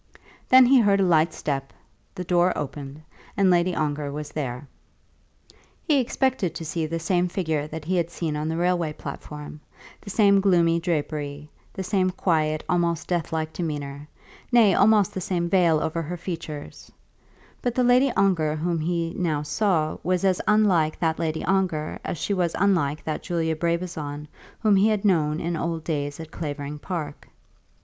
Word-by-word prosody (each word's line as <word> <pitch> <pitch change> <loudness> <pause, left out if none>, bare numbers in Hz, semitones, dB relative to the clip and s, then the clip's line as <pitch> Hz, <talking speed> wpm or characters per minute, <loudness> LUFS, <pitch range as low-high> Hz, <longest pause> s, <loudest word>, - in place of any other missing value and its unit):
Then 260 0 +8
he 260 +1 +6
heard 200 -3 +3
a - - +4
light 165 -2 +3
step; 135 -3 -3 0.4
the 180 - -4
door 180 +1 +2
opened, 145 +1 -6 0.3
and 195 -2 +4
Lady 175 0 +2
Ongar 145 -1 -2
was 150 +1 -6
there. 135 -2 -4 1.2
He 295 -4 +4
expected 255 -6 0
to 165 - -5
see 160 0 -2
the 165 +2 -3
same 175 +2 +1
figure 160 -5 -2
that 155 0 -7
he 185 +2 0
had 170 -1 0
seen 165 -3 -3
on 150 +1 -2
the 160 +1 -2
railway 175 -3 0
platform, 150 +1 -8 0.4
the 200 - -10
same 200 -1 +4
gloomy 170 -4 +3
drapery, 150 -3 -3 0.2
the 190 - -5
same 185 -1 +1
quiet, 155 -4 0
almost 170 -2 0
deathlike 160 -2 -2
demeanour, 145 -3 -5 0.4
nay, 230 -5 +6
almost 205 +1 +4
the 190 - -4
same 175 -2 -1
veil 170 -3 +3
over 160 +2 -2
her 170 +3 -5
features; 160 -4 -7 0.7
but 245 -1 -1
the 255 - +2
Lady 250 +2 +4
Ongar 170 -6 +2
whom 165 +2 -1
he 170 +1 -1
now 155 -5 -1
saw 155 -1 0
was 180 +2 0
as 185 -2 +2
unlike 190 -8 +3
that 160 -1 0
Lady 160 -1 -2
Ongar 185 -6 0
as - - -4
she 200 - -1
was 175 -3 0
unlike 165 -7 +1
that 155 - -3
Julia 165 -2 -1
Brabazon 160 -3 -3 0.3
whom 210 -3 +4
he 200 +3 +4
had 215 -2 0
known 155 -5 +2
in 170 +1 -2
old 165 0 -3
days 145 -3 -3
at 160 -1 -8
Clavering 145 -2 -5
Park. 150 -4 -5
170 Hz, 170 wpm, -24 LUFS, 155-185 Hz, 1.2 s, Then